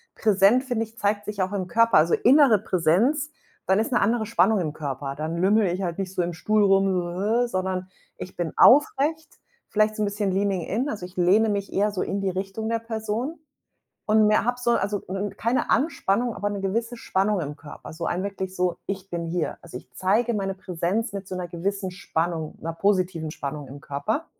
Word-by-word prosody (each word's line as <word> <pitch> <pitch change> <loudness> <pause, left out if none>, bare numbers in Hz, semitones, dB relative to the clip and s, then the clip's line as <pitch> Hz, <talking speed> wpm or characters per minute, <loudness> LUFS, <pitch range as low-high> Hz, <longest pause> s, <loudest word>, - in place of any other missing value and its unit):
präsent, 210 +4 +4
finde 245 -4 -1
ich, 225 +1 -22
zeigt 205 -1 0
sich 205 -1 -3
auch 185 - -1
im 195 -3 -3
Körper, 230 +4 +3
also, 160 +2 +4
innere 260 -4 +5
Präsenz. 210 - +1 0.4
Dann 190 +2 +3
ist 225 - -1
'ne 240 - +3
andere 225 +2 +1
Spannung 210 0 +3
im 155 -3 -2
Körper. 140 -2 -5
Dann 155 +2 -3
lümmele 195 +2 +3
ich 180 +2 -3
halt 175 -2 -3
nicht 190 -1 -4
so - - +1
im 175 - -2
Stuhl 210 +6 +1
rum, 195 0 +4
so, 175 -1 -1 0.3
hä, 245 - -1
sondern 185 -2 -3 0.3
ich 185 - -9
bin 170 -3 -2
aufrecht, 295 +3 +4 0.3
vielleicht 215 0 +1
so - - -2
'n - - +2
bisschen 205 -1 -1
leaning 195 -1 0
in. 225 - -2
Also, 210 -9 -4
ich 180 +1 -14
lehne 195 +5 +4
mich 200 -1 -2
eher 205 +2 +2
so 195 - -3
in 200 - -3
die 195 - 0
Richtung 195 +4 -4
der 230 - 0
Person 225 +6 -4 0.7
und 215 0 +4
mehr 215 +1 +3
habe 245 +1 0
so, 240 -1 +2
also, 205 -2 0 0.3
keine 235 +3 0
Anspannung, 240 -6 +1
aber 205 0 -2
'ne 200 -1 -4
gewisse 230 +5 -2
Spannung 200 -2 0
im 145 -2 -5
Körper, 150 - -11
so 165 +1 -5
ein 180 +2 -1
wirklich 190 -2 -4
so: 180 -1 0
„Ich 195 -1 -5
bin 170 -1 -3
hier.“ 165 0 -2
Also, 165 -7 -10
ich 125 - -10
zeige 220 +6 +1
meine 195 -2 -2
Präsenz 190 +5 -2
mit 200 -1 -6
so 185 - -6
'ner 180 -1 -4
gewissen 190 +3 -3
Spannung, 165 -3 -3
'ner 165 +1 -4
positiven 180 -4 0
Spannung 145 0 -6
im 140 +2 -10
Körper 145 - -3
195 Hz, 210 wpm, -25 LUFS, 180-220 Hz, 0.7 s, innere